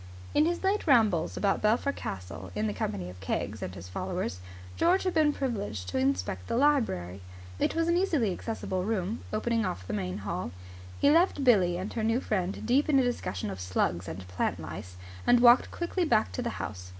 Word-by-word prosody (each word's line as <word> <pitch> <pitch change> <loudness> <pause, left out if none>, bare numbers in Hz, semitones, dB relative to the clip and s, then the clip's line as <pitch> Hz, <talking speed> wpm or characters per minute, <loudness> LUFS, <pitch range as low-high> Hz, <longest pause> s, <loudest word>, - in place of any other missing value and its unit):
In 305 - +4
his 345 +2 -2
late 390 0 +1
rambles 215 - +3
about 200 -1 +1
Belpher 230 +6 +2
Castle 95 - -7
in 105 +1 0
the 105 - -1
company 100 -3 -3
of 90 0 -10
Keggs 100 +2 -3
and 90 - -5
his 90 -1 -9
followers, 90 0 -3 0.4
George 365 +3 +3
had 370 -2 0
been 310 -2 +4
privileged 105 - -3
to 130 - -1
inspect 95 -8 -1
the - - -1
library. 225 - +1 0.4
It - - +1
was 330 0 +1
an 340 - +3
easily 315 - +1
accessible 190 -3 -3
room, 210 +1 -1
opening 230 +1 0
off 95 - -3
the - - -5
main 90 -3 -2
hall. 95 -4 -4 0.5
He 285 - +5
left 330 -3 +3
Billie 190 -9 +4
and 190 +3 -5
her 225 - -2
new 225 +2 +2
friend 195 -5 -2
deep 265 +6 +2
in 285 - +5
a 265 - +5
discussion 105 - -2
of 95 -1 -7
slugs 90 0 -1
and 90 +2 -7
plant 90 0 -1
lice, 90 0 -8 0.3
and 245 0 +6
walked 240 +1 +6
quickly 350 +1 -2
back 225 -9 +2
to - - -3
the 240 - -1
house. 90 -3 -6
205 Hz, 200 wpm, -29 LUFS, -, 0.5 s, and